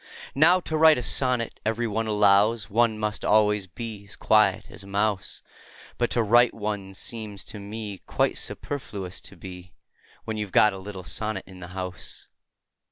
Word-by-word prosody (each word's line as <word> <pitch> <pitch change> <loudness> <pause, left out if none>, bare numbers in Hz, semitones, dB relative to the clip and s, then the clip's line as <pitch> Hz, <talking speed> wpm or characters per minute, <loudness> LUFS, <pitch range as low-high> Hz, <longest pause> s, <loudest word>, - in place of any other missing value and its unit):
Now, 170 +6 +5
to 160 - -4
write 155 0 +6
a 125 - -3
sonnet, 125 -2 0
every 115 +2 -1
one 110 +1 -2
allows, 105 0 +3
One 115 0 +2
must 105 -1 -3
always 105 -2 +3
be 105 +2 -7
as 100 - -9
quiet 110 +1 +2
as - - -9
a - - -13
mouse; 100 0 -1 0.6
But 120 - +1
to 120 - +1
write 120 +3 +4
one 105 -3 -4
seems 105 -2 -5
to 105 - -5
me 105 -1 -6
Quite - - +1
superfluous 105 -10 -5
to - - -9
be, 90 0 -11 0.5
When 110 -1 -3
you 105 -1 -2
've - - -19
got 105 -1 +5
a 95 - -7
little 95 -1 -8
sonnet 95 +3 -3
in 95 -1 -13
the 90 - -8
house. 90 -1 -7
105 Hz, 175 wpm, -25 LUFS, 100-115 Hz, 0.6 s, write